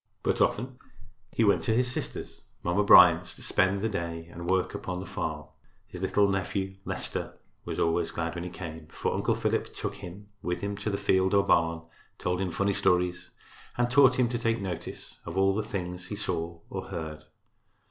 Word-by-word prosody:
But, - - +1
often 125 +3 0 0.5
he 115 - +1
went 100 -2 +4
to 110 - +2
his 125 +1 +2
sister's, - - -5 0.2
Mamma 90 +4 +2
Bryant's, 90 -3 +7
to - - -10
spend 95 +1 +2
the 110 - +1
day 85 -5 -3
and 85 +1 -6
work 95 0 +1
upon 90 -1 -4
the 95 - -6
farm. - - -4 0.4
His - - -9
little 105 -1 +3
nephew, 95 0 -2
Leicester, - - -3 0.3
was - - -4
always 85 0 +1
glad 85 0 -3
when 85 0 -5
he 90 - -4
came, 80 -3 -8
for - - -2
Uncle - - +1
Philip - - 0
took - - -4
him 95 +4 -10
with 90 0 -2
him 100 0 -2
to 105 +1 -3
the 100 - -1
field 95 -1 +2
or 100 0 +4
barn, 85 -2 +2 0.3
told 90 +1 -1
him 95 - 0
funny 100 +4 0
stories 90 -2 +1 0.5
and 120 0 +1
taught 130 -1 +6
him 125 -2 +4
to 120 -1 -2
take 115 0 +1
notice 90 -3 -6
of 85 +3 -6
all 95 0 +4
the 110 - 0
things 90 -4 -5
he 105 - -4
saw 85 -4 -3
or - - -4
heard. 80 -1 -6
95 Hz, 195 wpm, -28 LUFS, 85-100 Hz, 0.5 s, Bryant's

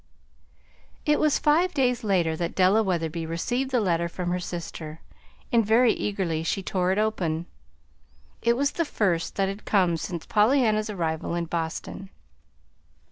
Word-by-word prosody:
It 300 -1 +3
was 305 -2 +3
five 330 +5 +2
days 250 -3 +1
later 175 -6 +1
that 170 +1 -3
Della 190 +4 +4
Wetherby 165 -4 -2
received 245 +11 -1
the 255 -2 +2
letter 170 -4 0
from 175 0 -3
her 180 - 0
sister, 165 -3 -6 0.5
and 235 -1 +4
very 225 +3 +4
eagerly 185 -6 -2
she 190 +4 -2
tore 185 -1 0
it 190 - 0
open. 175 -7 0 1.0
It 235 0 +2
was 280 +2 +1
the 335 - 0
first 185 - -1
that 195 -1 +1
had 195 +2 -5
come 180 -5 +2
since 170 +1 -5
Pollyanna's 215 -1 +3
arrival 165 -4 -2
in 170 0 -1
Boston. 165 +3 -4
190 Hz, 150 wpm, -26 LUFS, 170-225 Hz, 1.0 s, Della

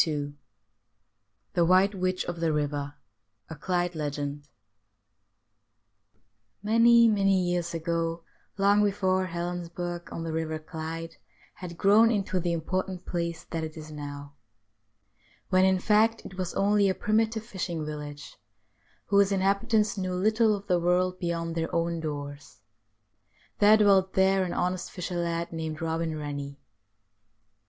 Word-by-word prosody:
13 155 -2 -2
II 145 0 -8 1.2
THE 175 - +3
WHITE 185 +4 +4
WITCH 185 -1 -1
OF 175 -1 -5
THE 165 -1 +1
RIVER— 145 -1 -2 0.6
A - - -5
CLYDE 175 +3 -1
LEGEND 145 -1 -4 2.2
Many, 230 +2 +6
many 195 -3 +3
years 175 -1 -1
ago, 165 0 -2 0.3
long 200 +1 +4
before 190 -2 +1
Helensburgh, 175 0 -5
on 165 - -5
the 165 - -4
Eiver 160 0 -2
Clyde, 165 0 -6 0.4
had 170 -2 -9
grown 210 +5 +5
into 195 -4 0
the 175 0 -1
important 185 +2 -3
place 170 -1 -3
that 165 -1 -2
it 155 0 -6
is 155 0 -9
now; 145 -1 -8 1.2
when, 185 0 +4
in 190 0 +3
fact, 215 +4 +2
it 190 - -9
was 185 -2 -4
only 200 0 +3
a 190 - 0
primitive 220 +1 0
fishing 175 -7 -4
village, 150 -1 -7 0.7
whose 200 0 +3
inhabitants 200 +2 +1
knew 185 -1 -2
little 215 +3 +3
of 200 0 -8
the 180 -3 +2
world 180 +1 +1
beyond 170 -1 -2
their 165 0 -2
own 170 0 0
doors, 145 -7 -7 1.0
there 210 +1 +7
dwelt 195 -3 +4
there 190 0 +3
an 175 - -4
honest 180 0 -2
fisher 180 -1 -5
lad, 170 0 -2
named 160 -1 -4
Eobin 165 0 -2
Eennie. 145 -2 -5
175 Hz, 135 wpm, -27 LUFS, 160-195 Hz, 2.2 s, there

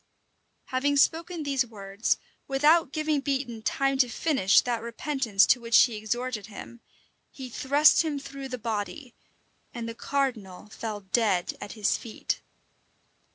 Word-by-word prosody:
Having 285 +2 +1
spoken 330 +3 +1
these 275 -3 +1
words, 200 -2 -2 0.3
without 295 +2 +3
giving 310 -1 0
Beatoun 265 -5 -2
time 275 +4 0
to 250 -2 +4
finish 250 -8 +3
that 240 -2 -2
repentance 235 -3 +1
to 245 - +3
which 230 0 +4
he 240 -3 -1
exhorted 220 0 -3
him, 230 +2 -11 0.5
he 260 -3 -9
thrust 285 +5 +4
him 310 -3 -2
through 275 -1 -8
the 250 - -4
body; 230 +4 -4 0.6
and 235 -1 -4
the 230 - -5
cardinal 230 -9 -3
fell 215 -1 -5
dead 195 -2 0
at 205 - -7
his 210 -2 +1
feet. 225 - -4
245 Hz, 140 wpm, -27 LUFS, 220-280 Hz, 0.6 s, to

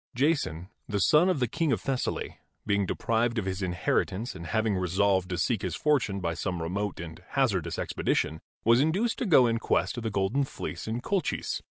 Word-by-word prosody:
Jason, 125 - 0 0.2
the 105 - 0
son 155 - +5
of 180 -6 +1
the 125 - +1
King 160 +6 0
of - - +1
Thessaly, 135 -2 -3 0.3
being 100 -2 +1
deprived 115 +4 0
of 105 - -1
his 95 +1 -3
inheritance 95 +5 -1
and 85 - -8
having 110 +2 +1
resolved 95 0 +1
to 90 - -2
seek 105 +3 0
his 90 -4 -2
fortune 130 -10 +1
by 85 -3 -1
some 90 0 -3
remote 95 +5 -3
and 80 -1 -8 0.2
hazardous 95 - +1
expedition, 80 +1 -1 0.2
was 115 +3 +6
induced 190 +10 +1
to 245 - -1
go 140 -8 +7
in 115 -1 +1
quest - - 0
of 120 - -4
the 115 - -1
Golden 100 +7 +1
Fleece 135 - -6
in 115 +2 -2
Colchis. 195 +7 -1
105 Hz, 195 wpm, -28 LUFS, 95-130 Hz, 0.3 s, go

